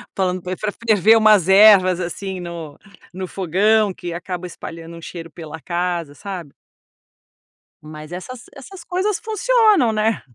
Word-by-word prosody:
falando 185 Hz, -2 st, -1 dB
pr 180 Hz, +1 st, -4 dB
pra 210 Hz, -1 st, -1 dB, 0.2 s
ferver 215 Hz, 0 st, +5 dB
umas 210 Hz, -5 st, +4 dB
ervas, 190 Hz, -3 st, +6 dB
assim, 185 Hz, +2 st, -5 dB
no-no 175 Hz, +2 st, -9 dB
fogão, 200 Hz, +4 st, +1 dB
que 175 Hz, -1 st, -7 dB
acaba 180 Hz, +1 st, -6 dB
espalhando 165 Hz, -1 st, -9 dB
um 165 Hz, -, -11 dB
cheiro 165 Hz, 0 st, -9 dB
pela 160 Hz, -1 st, -9 dB
casa, 175 Hz, -3 st, -3 dB
sabe? 180 Hz, -4 st, -8 dB, 1.3 s
Mas 155 Hz, +1 st, -11 dB
essas 235 Hz, +8 st, -8 dB
essas 340 Hz, +7 st, -12 dB
coisas 375 Hz, +3 st, -1 dB
funcionam 435 Hz, -, +2 dB
né? 215 Hz, -1 st, 0 dB
185 Hz, 135 wpm, -20 LUFS, 170-215 Hz, 1.3 s, ervas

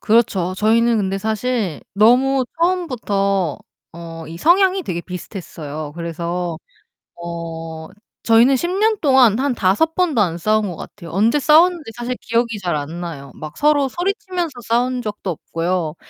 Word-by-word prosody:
그렇죠. 200 Hz, -5 st, +2 dB
저희는 230 Hz, +2 st, +3 dB
근데 195 Hz, -1 st, -1 dB
사실 220 Hz, -4 st, -2 dB
너무 255 Hz, +6 st, +4 dB
처음부터 205 Hz, -, 0 dB, 0.4 s
어 165 Hz, -1 st, -8 dB
이 165 Hz, -, -8 dB
성향이 375 Hz, -, +4 dB
되게 175 Hz, -1 st, -3 dB
비슷했어요. 155 Hz, -5 st, -7 dB
그래서 170 Hz, 0 st, -3 dB, 0.6 s
어 165 Hz, -1 st, -6 dB, 0.4 s
저희는 235 Hz, +4 st, +5 dB
10 345 Hz, -, -2 dB
년 430 Hz, +3 st, +2 dB
동안 260 Hz, -6 st, +5 dB
한 270 Hz, -2 st, 0 dB
5 225 Hz, +12 st, +2 dB
번도 320 Hz, -11 st, +2 dB
안 170 Hz, -3 st, 0 dB
싸운 215 Hz, +3 st, +1 dB
것 175 Hz, -, -5 dB
같아요. 170 Hz, -5 st, -10 dB
언제 220 Hz, -, +2 dB
싸웠는지 315 Hz, -1 st, +4 dB
사실 240 Hz, +1 st, -3 dB
기억이 230 Hz, -1 st, 0 dB
잘 175 Hz, -4 st, -1 dB
안 155 Hz, +4 st, -5 dB
나요. 145 Hz, -5 st, -7 dB
막 155 Hz, 0 st, -9 dB
서로 290 Hz, -2 st, +3 dB
소리치면서 365 Hz, -, -2 dB, 0.2 s
싸운 245 Hz, +2 st, +1 dB
적도 205 Hz, -4 st, -4 dB
없고요. 165 Hz, 0 st, -2 dB
215 Hz, 290 characters per minute, -19 LUFS, 170-265 Hz, 0.6 s, 저희는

